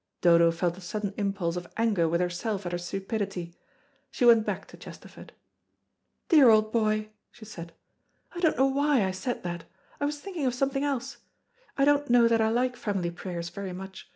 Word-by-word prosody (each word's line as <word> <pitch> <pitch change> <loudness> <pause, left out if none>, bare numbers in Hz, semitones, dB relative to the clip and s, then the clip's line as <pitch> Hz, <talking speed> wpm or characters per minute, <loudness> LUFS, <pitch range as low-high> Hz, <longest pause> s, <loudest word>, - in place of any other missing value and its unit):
Dodo 170 -1 +5
felt 170 +1 -2
a - - -13
sudden 205 +1 -4
impulse 195 -4 -2
of 175 0 -6
anger 215 -7 +2
with 170 +2 +1
herself 185 +3 -2
at 175 - -3
her 175 - -1
stupidity. 195 -1 -4 0.6
She 245 - -1
went 230 -2 +6
back - - -3
to - - -13
Chesterford. - - -12 1.0
"Dear 295 -8 +7
old 215 -1 +4
boy," 215 -2 0 0.2
she 230 - -14
said, 170 -5 -9 0.6
"I 350 - -6
don't 325 -3 +2
know 265 - +4
why 275 -4 +2
I 190 - -1
said 190 +7 -4
that. 175 -1 -5 0.3
I 285 - 0
was 295 0 -3
thinking 345 -6 -3
of 250 - -1
something 275 +2 0
else. 275 -4 -3 0.6
I 275 - +4
don't 290 -1 +2
know 240 -1 +6
that 230 -1 +2
I 220 - +2
like 250 +2 0
family 195 -7 -2
prayers 170 -1 -6
very 195 -1 -6
much. 190 +1 -9
215 Hz, 190 wpm, -27 LUFS, 180-250 Hz, 1.0 s, Dear